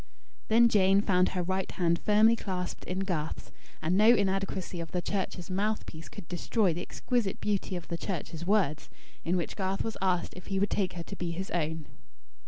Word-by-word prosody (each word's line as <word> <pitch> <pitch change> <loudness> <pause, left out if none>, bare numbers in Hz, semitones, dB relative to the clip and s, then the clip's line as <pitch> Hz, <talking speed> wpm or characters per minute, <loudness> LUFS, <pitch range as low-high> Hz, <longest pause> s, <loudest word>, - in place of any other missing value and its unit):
Then 235 +2 +6
Jane 195 -3 +4
found 180 -3 +3
her 180 -1 -2
right 190 +1 -1
hand 170 -2 +1
firmly 215 +2 +5
clasped 185 -5 -4
in 185 +2 -2
Garth's; 165 -5 -3 0.3
and 165 +3 +2
no 210 +3 +5
inadequacy 195 -5 +2
of 165 -1 -6
the 180 - 0
Church's 190 -1 -3
mouth 210 +3 0
piece 160 +1 -9
could 165 - -10
destroy 180 +1 +1
the 175 - -4
exquisite 235 0 -1
beauty 200 -2 -1
of 175 - -6
the 170 - -4
Church's 170 -3 -4
words, 180 -6 +1 0.3
in 180 +2 +1
which 170 - -3
Garth 190 -1 -1
was 225 - -4
asked 185 -2 +1
if 180 - -11
he 195 - -1
would 200 +1 +1
take 190 -3 0
her 170 -1 -5
to 200 - -8
be 175 -3 -3
his 185 +3 -4
own. 160 -2 -1
185 Hz, 195 wpm, -30 LUFS, 175-200 Hz, 0.3 s, Then